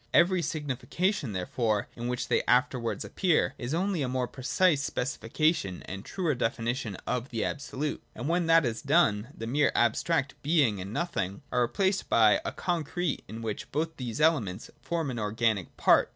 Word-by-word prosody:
Every 180 Hz, +1 st, +5 dB
signification, 155 Hz, -, -1 dB
therefore, 105 Hz, +3 st, -1 dB
in 120 Hz, +1 st, -4 dB
which 125 Hz, 0 st, -2 dB
they -, -, +2 dB
afterwards 125 Hz, -2 st, +1 dB
appear, 175 Hz, -7 st, +1 dB
is 120 Hz, 0 st, -4 dB
only 185 Hz, -1 st, 0 dB
a 135 Hz, -, 0 dB
more 125 Hz, -1 st, -1 dB
precise 145 Hz, +5 st, +2 dB
specifica 135 Hz, +5 st, +1 dB
tion 95 Hz, -, -5 dB
and 95 Hz, +1 st, -7 dB
truer 175 Hz, 0 st, -1 dB
definition 115 Hz, -2 st, -2 dB
of 125 Hz, +1 st, -2 dB
the 115 Hz, -3 st, -1 dB
Absolute. 145 Hz, +1 st, -3 dB
And 120 Hz, +5 st, -4 dB
when 170 Hz, +1 st, +1 dB
that 165 Hz, -2 st, +5 dB
is 115 Hz, -2 st, -2 dB
done, 105 Hz, +1 st, +3 dB
the 115 Hz, -, -7 dB
mere 140 Hz, +5 st, +2 dB
abstract 135 Hz, +5 st, +2 dB
Being 140 Hz, -, +2 dB
and 95 Hz, +2 st, -6 dB
Nothing 110 Hz, -, -2 dB
are 125 Hz, -, +2 dB
replaced 190 Hz, -, 0 dB
by 110 Hz, -2 st, +5 dB
a -, -, -2 dB
concrete 175 Hz, -2 st, -2 dB
in 115 Hz, +1 st, -7 dB
which 110 Hz, -2 st, -4 dB
both 160 Hz, +1 st, -2 dB
these 125 Hz, 0 st, -4 dB
elements 120 Hz, -, +1 dB
form 165 Hz, -5 st, -2 dB
an 120 Hz, -, -4 dB
organic 105 Hz, -3 st, 0 dB
part. -, -, +5 dB
130 Hz, 170 wpm, -29 LUFS, 115-165 Hz, -, Every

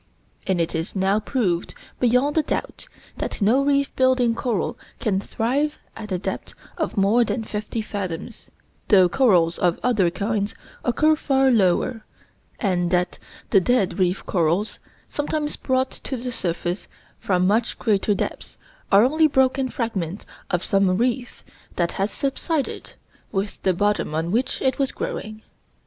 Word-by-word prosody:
And 190 Hz, -2 st, +1 dB
it 165 Hz, 0 st, 0 dB
is 165 Hz, +3 st, -3 dB
now 195 Hz, +2 st, +2 dB
proved, 205 Hz, -7 st, -1 dB, 0.2 s
beyond 250 Hz, +4 st, +3 dB
a 315 Hz, -, +4 dB
doubt, -, -, -4 dB, 0.3 s
that -, -, -4 dB
no 235 Hz, +7 st, +3 dB
reef 280 Hz, 0 st, +1 dB
building 255 Hz, -2 st, +3 dB
coral 230 Hz, -4 st, -1 dB, 0.2 s
can 195 Hz, -3 st, +1 dB
thrive 270 Hz, +9 st, -1 dB, 0.2 s
at 215 Hz, -2 st, -8 dB
a 185 Hz, -, +1 dB
depth 180 Hz, -, -5 dB, 0.2 s
of 320 Hz, -9 st, -3 dB
more 205 Hz, +5 st, +4 dB
than 230 Hz, 0 st, -2 dB
fifteen 215 Hz, +1 st, -4 dB
fathoms, 185 Hz, -6 st, -6 dB, 0.4 s
though 190 Hz, -4 st, +6 dB
corals 175 Hz, -7 st, +3 dB
of 175 Hz, -1 st, +2 dB
other 215 Hz, -8 st, +3 dB
kinds 200 Hz, +3 st, -2 dB, 0.3 s
occur 310 Hz, +6 st, +3 dB
far 270 Hz, -3 st, +2 dB
lower, 215 Hz, +2 st, +2 dB, 0.6 s
and 180 Hz, -4 st, +1 dB
that 180 Hz, 0 st, 0 dB, 0.3 s
the 195 Hz, -, +6 dB
dead 205 Hz, -3 st, +1 dB
reef 185 Hz, 0 st, +1 dB
corals, 175 Hz, +4 st, 0 dB, 0.3 s
sometimes 295 Hz, 0 st, -2 dB
brought 260 Hz, 0 st, 0 dB
to 265 Hz, -, -5 dB
the 250 Hz, +1 st, -4 dB
surface 175 Hz, -2 st, -2 dB, 0.3 s
from 185 Hz, -2 st, +1 dB
much 220 Hz, +5 st, +1 dB
greater 210 Hz, -2 st, +1 dB
depths, -, -, -4 dB, 0.3 s
are 200 Hz, +2 st, +7 dB
only 310 Hz, +5 st, +4 dB
broken 265 Hz, -1 st, +2 dB
fragments 200 Hz, -7 st, -3 dB, 0.2 s
of 180 Hz, 0 st, 0 dB
some 195 Hz, -2 st, +2 dB
reef 245 Hz, +1 st, -1 dB, 0.3 s
that 175 Hz, -1 st, 0 dB
has 195 Hz, +2 st, -1 dB
subsided 280 Hz, +3 st, -2 dB, 0.4 s
with 195 Hz, +1 st, -3 dB
the 190 Hz, -, +2 dB
bottom 205 Hz, -5 st, 0 dB
on 165 Hz, +2 st, -1 dB
which 240 Hz, +5 st, 0 dB
it 265 Hz, +2 st, +1 dB
was 270 Hz, -1 st, +1 dB
growing. 220 Hz, -, -5 dB
215 Hz, 150 wpm, -23 LUFS, 185-260 Hz, 0.6 s, are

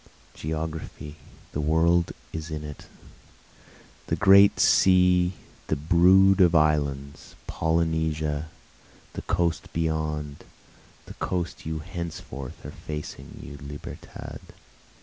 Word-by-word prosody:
Geography, 80 Hz, -1 st, -5 dB, 0.3 s
the 75 Hz, -, -2 dB
world, 85 Hz, +3 st, +2 dB, 0.2 s
is 80 Hz, 0 st, -5 dB
in 75 Hz, -1 st, -5 dB
it, 75 Hz, -1 st, -9 dB, 1.2 s
The -, -, 0 dB
Great 100 Hz, +1 st, +6 dB
Sea, 90 Hz, -1 st, +4 dB, 0.3 s
the -, -, +1 dB
brood 90 Hz, +5 st, +5 dB
of 90 Hz, -1 st, +5 dB
islands, 70 Hz, -2 st, 0 dB
Polynesia, 80 Hz, -2 st, -1 dB, 0.7 s
the -, -, -5 dB
coast 85 Hz, -3 st, -1 dB
beyond, 75 Hz, -3 st, -2 dB, 0.6 s
The -, -, -10 dB
coast 85 Hz, -3 st, -3 dB
you 80 Hz, -1 st, -3 dB
henceforth 85 Hz, -7 st, -7 dB
are -, -, -6 dB
facing 75 Hz, -2 st, -8 dB
you 70 Hz, +1 st, -9 dB
Libertad! 70 Hz, +1 st, -9 dB
80 Hz, 100 wpm, -26 LUFS, 75-85 Hz, 1.2 s, Great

